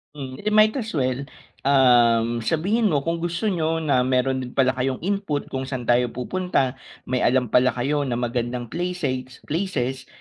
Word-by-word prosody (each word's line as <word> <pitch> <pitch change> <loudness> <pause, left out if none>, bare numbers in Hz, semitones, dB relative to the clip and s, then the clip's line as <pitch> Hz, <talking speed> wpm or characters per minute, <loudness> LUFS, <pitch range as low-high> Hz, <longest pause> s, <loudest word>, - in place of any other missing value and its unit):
Hmm. 130 -2 -7
Eh 210 - -7
di - - +2
might 215 0 +6
as 215 -7 -5
well, 130 0 -1 0.4
um, 120 -4 +4
sabihin 190 - +1
mo 145 -6 +1
kung 165 +2 -1
gusto 175 +3 -3
niyo 160 -2 -1
na 140 -4 +2
meron 130 +1 +1
din 125 -1 -7
pala 130 -1 +4
kayong 130 +1 -2
input 195 -7 -2
kung 130 0 -3
saan 130 -2 -4
tayo 120 +1 +3
pupunta, 135 0 -1 0.2
may 130 0 -1
alam 125 -2 +2
pala 125 -1 +3
kayo 140 +3 0
na 120 - -1
magandang 120 0 -3
places 155 -8 -3
places, 145 -7 -2
130 Hz, 175 wpm, -23 LUFS, 125-165 Hz, 0.4 s, might